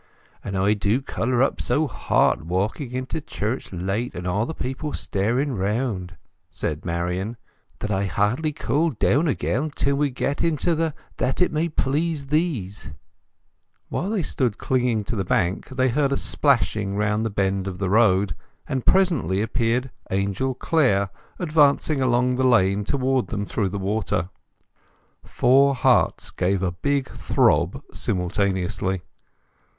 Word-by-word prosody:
"And 100 -1 -3
I 100 +2 +3
do 105 +3 +1
colour 125 -2 0
up 135 - 0
so 155 - +1
hot, 80 - +1
walking 100 - -2
into 130 +4 -3
church 115 -2 -4
late, 95 +7 -2
and 90 - -5
all 100 +6 0
the 160 - -5
people 135 +4 -4
staring 120 +8 0
round," 100 -3 -2 0.3
said 75 0 -3
Marian, 90 +6 -2 0.4
"that 105 - -2
I 100 0 +1
hardly 105 - 0
cool 150 +4 0
down 145 +4 +2
again 140 +1 0
till 140 -1 0
we 145 0 +1
get 140 +2 -2
into 165 +1 +1
the 160 -1 -1 0.2
That 130 - -1
it 180 - +3
may 160 +2 0
please 150 +1 -1
Thees." 135 - -1 1.0
While 185 - -2
they 210 -5 0
stood 120 -7 -1
clinging 125 -4 0
to 115 - -4
the 95 - -1
bank 90 0 0
they 130 0 +1
heard 140 +2 +1
a 140 - +1
splashing 105 -8 +1
round 105 +1 +1
the 115 - 0
bend 95 -1 0
of 95 -2 -4
the 95 0 -1
road, 100 -3 +3 0.3
and 130 -2 -2
presently 150 - +3
appeared 120 +3 0 0.2
Angel 100 +7 -1
Clare, 120 - +2 0.3
advancing 150 -3 +3
along 125 0 +2
the 130 - +1
lane 100 -4 +3
towards 130 0 +1
them 105 -1 -3
through 100 -1 -1
the 100 - -4
water. 95 -3 -1 0.9
Four 135 +3 +4
hearts 125 - +2
gave 95 +1 0
a 90 - +1
big 140 +9 -1
throb - - +1
simultaneously. 95 0 -1
115 Hz, 145 wpm, -23 LUFS, 100-140 Hz, 1.0 s, Four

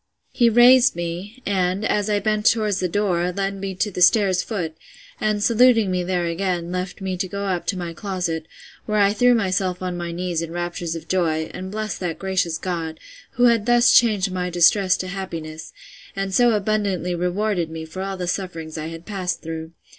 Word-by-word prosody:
He 240 -2 +4
raised 245 +2 +6
me, 175 +8 -6
and, 190 +1 0
as 210 -1 0
I 205 -1 +2
bent 215 0 0
towards 215 -4 +2
the 180 - -1
door, 180 -2 0
led 195 +1 -2
me 195 -1 -4
to 205 +3 -1
the 180 - -5
stairs 185 -1 +4
foot, 175 -8 -4 0.5
and, 210 -1 0
saluting 230 -3 +4
me 180 -1 0
there 175 -1 -1
again, 175 0 -2
left 180 +1 -4
me 190 -1 -2
to 190 +1 -2
go 200 +2 -4
up 185 -3 -2
to 195 - -1
my 175 -2 -5
closet, 175 -4 -3 0.4
where 215 -1 0
I 200 -1 +4
threw 245 +3 +4
myself 185 -4 0
on 180 -1 -3
my 175 -1 -4
knees 175 -1 -2
in 165 - -5
raptures 175 -1 -4
of 165 - -8
joy, 160 -4 0
and 185 +1 -6
blessed 215 +1 -4
that 175 -3 -3
gracious 185 -4 -1
God, 165 -3 -4 0.3
who 245 -2 0
had 230 -2 +4
thus 240 0 +5
changed 210 -5 +4
my 180 -1 -2
distress 180 +2 +4
to 185 - -4
happiness, 165 -4 -6 0.4
and 195 -1 -3
so 240 +2 +4
abundantly 200 -4 0
rewarded 180 0 -1
me 160 0 -6
for 185 +4 -7
all 195 0 -4
the 180 - -3
sufferings 165 -4 -4
I 155 - -4
had 165 +1 -9
passed 190 -4 -3
through. 160 0 -6
185 Hz, 200 wpm, -22 LUFS, 175-205 Hz, 0.5 s, raised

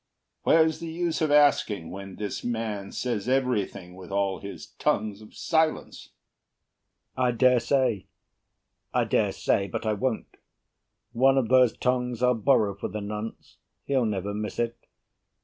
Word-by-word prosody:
Where's 160 -1 +3
the 165 -1 -6
use 170 0 -2
Of 155 - +2
asking 145 - +3
when 95 0 -8
this 105 -1 -5
man 110 -4 -3
says 120 -3 -2
everything, 110 -9 -1
With 95 -1 -11
all 100 -1 0
his 100 - -9
tongues 105 -1 0
of 110 - -15
silence? 160 -1 -1 1.1
BURR 130 - 0
I 125 - +3
dare 125 +1 +4
say. 125 -6 0 0.9
I - - +4
dare - - +1
say, 100 - 0
but 95 - -5
I 110 - +1
won't. 115 +3 -3 0.7
One 135 +3 +4
of 125 -4 +1
those 125 -2 +4
tongues 125 -1 -1
I'll 125 0 +5
borrow 110 -3 +2
for 95 - -5
the 105 - -5
nonce. 105 +2 -7 0.3
He'll 135 -3 +1
never 100 -1 -2
miss 105 0 -4
it. 120 0 -1
115 Hz, 150 wpm, -26 LUFS, 100-130 Hz, 1.1 s, I'll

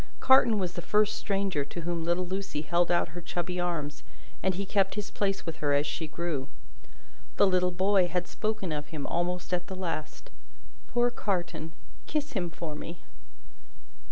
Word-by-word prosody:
Carton 255 -4 +6
was 180 -3 -1
the 175 - -4
first 210 +4 +3
stranger 195 -6 0
to 160 +5 -6
whom 170 0 -2
little 175 +2 +1
Lucie 185 -4 -3
held 170 +3 +2
out 175 - +3
her 175 +2 -7
chubby 175 +1 -2
arms, 165 -5 -2 0.4
and 190 -1 +2
he 200 +2 -2
kept 195 0 +2
his 210 -1 -4
place 195 -1 0
with 165 -2 -4
her 145 -1 +1
as 145 +1 +3
she 155 +2 -3
grew. 155 -4 -2 0.9
The - - +7
little 180 -1 +3
boy 190 +1 +3
had 180 0 -1
spoken 215 -5 -2
of 150 -1 -3
him, 150 -3 -5
almost 180 +1 -1
at 175 0 0
the 190 - -5
last. 170 -4 -4 0.6
"Poor 240 0 +2
Carton! 175 -7 -2 0.3
Kiss 300 -1 -1
him 180 -6 0
for 165 -1 -5
me!" 165 +3 -7
175 Hz, 175 wpm, -29 LUFS, 165-195 Hz, 0.9 s, The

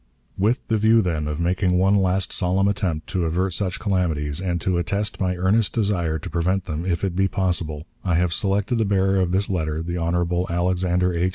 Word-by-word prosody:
"With 110 +6 0
the 110 -1 +1
view, 110 +1 +4
then, 80 -4 -1
of 75 +1 -3
making 90 +1 +1
one 95 +2 +3
last 95 -2 +1
solemn 95 +1 +1
attempt 95 -6 -1
to 90 -3 -1
avert 90 +3 0
such 95 -1 -2
calamities, 85 -6 -1
and 90 -2 -1
to 90 0 0
attest 100 +5 -2
my 90 -1 +1
earnest 95 +4 +1
desire 90 -8 0
to - - -8
prevent 90 +3 0
them, 85 -1 -4
if 85 -1 -1
it 95 -3 -1
be 95 +1 +2
possible, 85 -6 -2 0.2
I 90 -3 +1
have 85 0 +1
selected 100 +6 0
the 110 - +2
bearer 95 -1 +2
of 90 -2 +1
this 95 +2 +1
letter, 80 -4 -2
the 85 +1 -3
Hon. 85 +1 0
Alexander 90 +1 +1
H. 85 +2 +1
90 Hz, 205 wpm, -23 LUFS, 85-95 Hz, 0.2 s, view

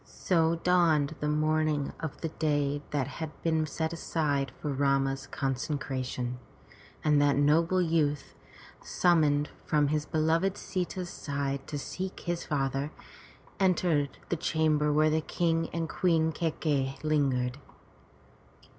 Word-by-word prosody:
So 165 -2 +1
dawned 165 -4 +2
the 150 - -1
morning 155 -1 +1
of 160 -4 -6
the 165 - -2
day 145 -2 0
that 145 -3 0
had 155 +3 -5
been 160 -1 +1
set 160 +1 -2
aside 145 -5 -1
for 150 -2 -2
Rama's 135 0 +1
consecration, 130 -2 -3 0.6
and 150 -2 +4
that 145 -1 +4
noble 165 +6 +3
youth, 155 -4 0 0.5
sum 175 -2 +3
moned 145 -1 +2
from 150 -2 +2
his 150 0 -1
beloved 165 +5 +1
Sita's 180 -1 -3
side 140 -1 -3
to 145 - -4
seek 185 +6 -5
his 175 -1 -2
father, 135 -1 -1 0.7
entered 175 -6 +2
the 175 - 0
chamber 155 -2 +1
where 155 +1 +3
the 160 +1 +2
King 165 0 0
and 165 -1 -2
Queen 160 -2 +2
Kai 165 +1 -1
key'i 135 -4 0
lingered. 135 -4 +1
155 Hz, 130 wpm, -29 LUFS, 140-165 Hz, 0.7 s, and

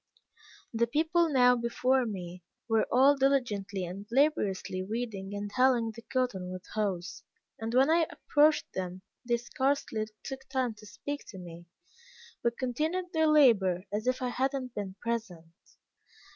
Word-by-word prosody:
The 235 +1 +2
people 325 +6 +2
now 250 -3 +5
before 245 +2 +1
me, 180 -3 -6 0.3
were 225 -1 +2
all 270 +3 +6
diligently 220 -9 0
and 195 +4 -8
laboriously 235 -9 +1
weeding 205 -1 -4
and 205 0 -4
hilling 250 -3 +3
the 230 +1 -11
cotton 230 -8 -2
with 185 0 -7
hoes, 195 -2 -2 0.4
and 225 0 -3
when 270 +4 +5
I 330 -1 +3
approached 300 +1 +2
them, 185 0 -5 0.2
they 240 -1 +1
scarcely 240 -2 -1 0.2
took 265 0 -7
time 260 -3 0
to 215 - -13
speak 285 +9 -6
to 195 - -10
me, 175 -1 -10 0.7
but 235 0 0
continued 315 +8 -2
their 320 -1 +3
labor 220 - +4
as 215 +3 -2
if 255 0 0
I 250 - 0
had 265 +3 0
not 255 -3 -4
been 195 -2 -5
present. 190 -9 -4
235 Hz, 150 wpm, -30 LUFS, 195-265 Hz, 0.7 s, all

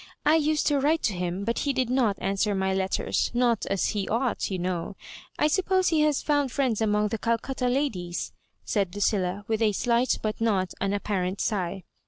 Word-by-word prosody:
I 305 +2 +5
used 310 0 +1
to 290 -2 +2
write 310 +4 +1
to 215 - +1
him, 180 +1 -3
but 230 +1 0
he 280 - 0
did 255 -2 0
not 235 -7 +2
answer 195 +2 0
my 190 0 0
letters 190 0 0
— - - -24
not 240 -3 +2
as 195 -1 0
he 205 -3 -2
ought, 235 +1 0
you 190 - -2
know. 180 +1 -3 0.4
I - - +2
sup 365 +5 +1
pose 375 -1 +3
he 320 -2 +2
has 300 -2 +2
found 290 -3 +1
friends 250 -5 0
among 210 -1 +2
the 225 - -3
Calcutta 240 +3 -1
ladies," 225 -10 -2 0.3
said 200 -3 -1
Lucilla, 205 -1 0
with 220 0 -1
a 215 -2 +3
slight 240 +4 +1
but 215 +1 -2
not 195 -5 +1
unap 200 +1 -1
parent 190 -1 -1
sigh. 190 -3 -2
220 Hz, 205 wpm, -26 LUFS, 195-265 Hz, 0.4 s, I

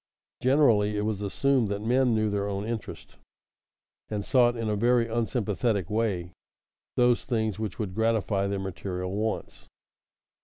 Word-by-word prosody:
Generally 115 -7 +3
it - - 0
was 105 -2 -2
assumed 125 +3 +1
that 100 0 -2
men 125 +1 +3
knew 110 -1 +1
their 100 0 -1
own 100 0 -3
interest, 115 -1 -6 0.9
and 105 -2 -3
sought 120 -2 +4
in 115 -1 -2
a 105 - 0
very 120 +2 +3
unsympathetic 110 -4 -1
way 100 -6 -1 0.6
those 125 -1 +3
things 110 -4 -1
which 110 -4 -4
would 100 -4 -3
gratify 110 -2 +1
their 100 0 -1
material 90 -1 -4
wants. 110 +2 -3
110 Hz, 145 wpm, -27 LUFS, 100-115 Hz, 0.9 s, sought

